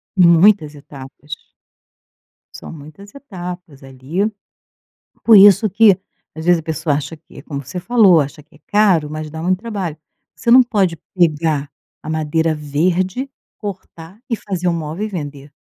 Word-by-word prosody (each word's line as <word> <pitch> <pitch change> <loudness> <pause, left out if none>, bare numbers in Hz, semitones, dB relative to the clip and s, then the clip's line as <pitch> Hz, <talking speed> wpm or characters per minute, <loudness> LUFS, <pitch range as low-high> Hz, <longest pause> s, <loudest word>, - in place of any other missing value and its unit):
Muitas 170 -2 +4
etapas. 140 +1 -11 1.2
São - - -10
muitas 160 +6 -13
etapas, 180 - -9
ali. 135 +10 -3 1.0
Por 225 - +7
isso 200 +2 +7
que, 205 -1 +4 0.4
às 160 - -8
vezes 175 -1 +3
a - - -15
pessoa 155 -2 -2
acha 145 +2 -6
que - - -18
é - - -10
como 140 -2 -6
você 180 +7 -6
falou 200 -5 +4
"acha 145 +1 -5
que 150 - -30
é - - -21
caro", 190 -8 +2
mas 155 0 -6
dá 160 +1 -7
muito 185 +2 0
trabalho. 195 -7 -5 0.4
Você 235 - -1
não 255 +2 +8
pode 200 -8 0 0.2
pegar, 155 -4 0 0.3
a - - -9
madeira 160 +1 0
verde 180 - -1 0.3
cortar 190 -3 -9
e 230 - -1
fazer 185 -4 -3
um - - +1
móvel 165 +4 -4
e - - -6
vender. 145 -6 -8
170 Hz, 155 wpm, -18 LUFS, 150-195 Hz, 1.2 s, não